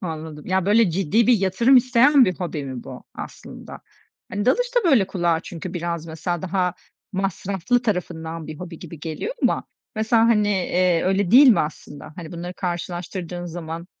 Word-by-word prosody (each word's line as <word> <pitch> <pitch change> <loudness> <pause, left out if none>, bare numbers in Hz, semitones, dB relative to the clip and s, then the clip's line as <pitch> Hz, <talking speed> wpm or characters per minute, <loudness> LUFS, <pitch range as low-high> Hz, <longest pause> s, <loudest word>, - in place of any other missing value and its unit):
Anladım. 160 -3 -6
Ya, 190 0 0
böyle, 210 -1 +4
ciddi 195 +6 +1
bir 250 - +6
yatırım 200 +8 +4
isteyen 255 +2 +5
bir 185 - 0
hobi 165 -5 -4
mi 130 -3 -7
bu - - -10
aslında? - - -9 0.5
Hani, 205 +2 -2
dalış - - +1
da, 480 - +3
böyle, 230 -9 +4
kulağa 175 -4 0
çünkü 175 +1 -8
biraz 170 -1 -3
mesela 165 +1 -4
daha 180 -1 0 0.4
masraflı 195 +4 -1
tarafından 165 -6 -3
bir 155 -1 -8
hobi 170 -2 -8
gibi 165 -3 -10
geliyor 165 - -4
ama. - - +1 0.3
Mesela, 225 +1 +3
hani, 210 -3 +3
eee, 180 -3 +1
öyle 190 0 +1
değil 265 +4 +8
mi 230 - +5
aslında? 150 0 -7
Hani, 170 -2 -8
bunları 175 +1 -6
karşılaştırdığın 175 0 -4
zaman? 170 0 -6
180 Hz, 165 wpm, -22 LUFS, 165-205 Hz, 0.5 s, değil